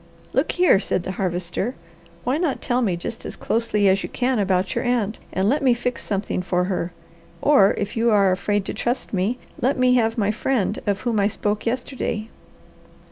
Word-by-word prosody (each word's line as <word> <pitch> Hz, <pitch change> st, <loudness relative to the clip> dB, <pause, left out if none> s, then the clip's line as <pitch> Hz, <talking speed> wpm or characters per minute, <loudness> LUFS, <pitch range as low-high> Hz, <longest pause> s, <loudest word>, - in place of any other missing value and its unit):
"Look -, -, +1 dB
here!" 355 Hz, -, +5 dB
said 185 Hz, -3 st, -1 dB
the 185 Hz, -, -3 dB
Harvester. 185 Hz, +5 st, -2 dB, 0.5 s
"Why 260 Hz, +5 st, 0 dB
not 330 Hz, -6 st, 0 dB
tell 245 Hz, 0 st, 0 dB
me 190 Hz, -7 st, +1 dB
just 220 Hz, +6 st, -5 dB
as -, -, -6 dB
closely 220 Hz, -3 st, +1 dB
as 195 Hz, +1 st, +3 dB
you -, -, -5 dB
can 250 Hz, -1 st, 0 dB
about 190 Hz, -2 st, +1 dB
your -, -, -1 dB
aunt, 235 Hz, -4 st, 0 dB
and 190 Hz, +1 st, 0 dB
let 285 Hz, +7 st, +2 dB
me 255 Hz, -3 st, +4 dB
fix 245 Hz, +1 st, -3 dB
something 200 Hz, -2 st, -2 dB
for 180 Hz, 0 st, 0 dB
her; 180 Hz, -2 st, -2 dB, 0.5 s
or 275 Hz, -10 st, +5 dB
if 200 Hz, -, -3 dB
you 235 Hz, +1 st, +2 dB
are 200 Hz, -3 st, +4 dB
afraid 205 Hz, +2 st, 0 dB
to -, -, -4 dB
trust 240 Hz, +4 st, -2 dB
me, 200 Hz, +6 st, 0 dB, 0.2 s
let 260 Hz, +4 st, +2 dB
me 255 Hz, 0 st, +4 dB
have 225 Hz, -2 st, +2 dB
my 210 Hz, -2 st, +2 dB
friend 215 Hz, -2 st, 0 dB
of 200 Hz, -1 st, 0 dB
whom 235 Hz, -4 st, 0 dB
I 200 Hz, -, +3 dB
spoke 210 Hz, +1 st, -2 dB
yesterday." 235 Hz, -3 st, -2 dB
215 Hz, 195 wpm, -23 LUFS, 195-245 Hz, 0.5 s, here